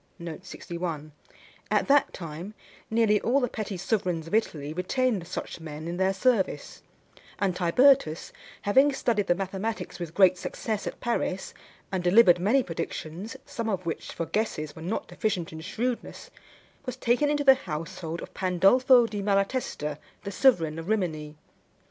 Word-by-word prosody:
At - - +2
that 285 0 +5
time 170 +4 -7 0.3
nearly 220 -2 +3
all 260 +4 +2
the 250 - +1
petty 215 -4 -5
sovereigns 180 -4 -1
of 165 - -10
Italy 155 -9 0
retained 195 +2 0
such - - -5
men 155 0 -7
in 170 +1 -3
their 190 +1 +2
service; 195 0 0 0.6
and 195 -3 0
Tibertus, 180 - +3 0.3
having 270 +8 +4
studied 225 -6 0
the 175 - +3
mathematics 195 +4 -4
with 170 -2 -6
great 185 -2 +5
success 215 +1 -3
at - - -5
Paris, 235 -5 -2 0.4
and 185 -2 -1
delivered 180 -1 +6
many 230 +9 +3
predictions, 170 +3 -5
some 230 -1 -4
of 185 -4 -2
which, 165 - -4
for 165 - -3
guesses, 155 -8 -2
were 160 - -10
not 180 +7 -3
deficient 180 -7 -2
in 160 - -7
shrewdness, 235 +8 -4 0.5
was 255 -3 -5
taken 245 +5 +2
into 290 0 +1
the 270 -1 +9
household 165 -5 -5
of - - -11
Pandolfo 235 +8 +5
di 210 -3 -4
Malatesta, 195 - -1 0.2
the 200 - -4
sovereign 170 - +3
of 165 +4 -7
Rimini. 155 -8 -1
195 Hz, 150 wpm, -27 LUFS, 170-230 Hz, 0.6 s, the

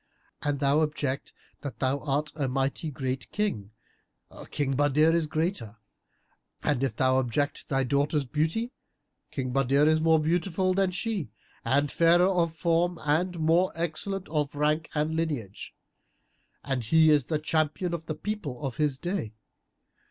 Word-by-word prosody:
An 145 -1 -1
thou 140 +2 +3
object 150 -3 -2 0.3
that 140 - -6
thou 135 +1 0
art 150 +1 -1
a 145 -3 -1
mighty 135 +4 -1
great 130 -3 -4
King, 200 - -2 0.8
King 135 -2 -1
Badr 145 +1 +2
is 165 -1 +2
a - - -11
greater; 155 - -2 0.9
and 140 -3 +1
if 130 -6 -1
thou 130 +1 +3
object 130 +3 -1
thy 135 -1 +1
daughter's 140 +2 +1
beauty, 160 - -1 0.6
King 130 -2 -4
Badr 135 +2 +3
is 155 0 +3
more 160 0 +4
beautiful 180 +3 +1
than 195 0 +2
she 185 - -2 0.3
and 140 +4 +1
fairer 170 +1 +5
of 175 -4 +1
form 170 +1 +1
and 170 +4 +1
more 165 +4 +3
excellent 170 +4 -2
of 150 -2 -1
rank 150 +2 +1
and 150 +1 0
lineage; 145 -12 -3 0.9
and 135 -3 -2
he 160 +6 +5
is 145 -4 +4
the 155 - 0
champion 155 +3 0
of 165 -1 -5
the 155 - -3
people 160 - -4
of 135 0 -4
his 150 -4 +1
day. 175 - -3
150 Hz, 150 wpm, -27 LUFS, 135-165 Hz, 0.9 s, fairer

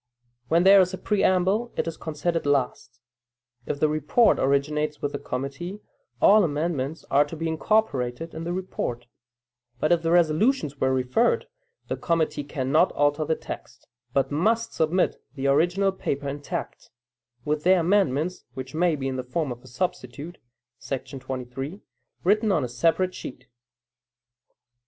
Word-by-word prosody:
When 165 +4 +3
there 195 +1 +8
is 185 0 0
a - - -10
preamble, 200 +3 +1
it - - 0
is 165 - -3
considered 165 0 -2
last. 130 -3 -1 0.7
If 145 - -2
the 155 - +4
report 155 - +3
originates 150 +2 0
with 145 - -2
the 145 - -4
committee, 140 +10 -5 0.4
all 210 +1 +6
amendments 150 -2 -2
are 140 +1 +6
to 145 - -8
be 165 +1 -3
incorporated 160 - 0
in 160 - -6
the 170 - -3
report; 175 -10 -4 0.7
but, 155 - +1
if 170 -1 +4
the 165 - -1
resolutions 170 - +2
were 130 - +3
referred, 130 - +2 0.4
the - - -2
committee 165 -3 0
cannot 135 -2 +1
alter 145 +1 +1
the 160 +1 +1
text, - - -9 0.2
but 135 +2 +1
must 220 +10 +1
submit 165 +3 +1
the 135 -1 -4
original 175 +8 +3
paper 145 -6 -3
intact, 145 +1 -5 0.6
with 150 0 -1
their 185 0 +5
amendments 180 -2 +1
(which 130 +2 -7
may 170 0 +2
be 135 -2 -3
in 130 -1 -2
the 130 - -3
form 145 +2 -2
of 120 0 -7
a - - -16
substitute, 145 +3 -4 0.4
§ 135 0 -5
23) 130 +6 -6 0.4
written 215 +3 +3
on - - +2
a - - -1
separate 165 +9 +1
sheet. - - -8
155 Hz, 150 wpm, -25 LUFS, 140-180 Hz, 0.7 s, there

